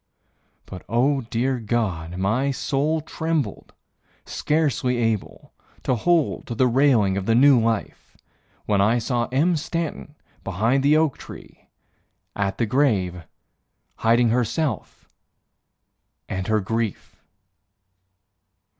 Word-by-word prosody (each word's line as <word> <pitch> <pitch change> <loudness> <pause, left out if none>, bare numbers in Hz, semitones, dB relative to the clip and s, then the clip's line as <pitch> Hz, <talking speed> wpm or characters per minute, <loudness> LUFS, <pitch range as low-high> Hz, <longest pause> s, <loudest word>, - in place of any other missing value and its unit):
But 90 - -9
oh, 135 +4 +2
dear 120 +2 -1
God, 100 -7 -2
my 110 +9 0
soul 145 +3 -1
trembled, 160 - -3 0.5
scarcely 145 -5 0
able 115 -4 -3 0.3
To 130 - +1
hold 165 +6 +1
to 120 - -4
the 130 - +3
railing 120 -6 +3
of 95 - -4
the 115 - +3
new 135 +1 +6
life 115 -2 -3 0.5
When 100 -2 +2
I 110 +4 +3
saw 120 0 -1
Em 155 +7 +1
Stanton 160 -1 -4 0.3
behind 110 +8 +1
the 145 +3 +4
oak 155 -3 +1
tree - - -13 0.7
At 100 -1 -2
the 115 - +1
grave, 100 - 0 0.7
Hiding 115 +1 +3
herself, 125 - -2 1.2
and 95 -1 -4
her 110 -1 +2
grief! 115 +1 -3
120 Hz, 110 wpm, -23 LUFS, 105-140 Hz, 1.2 s, new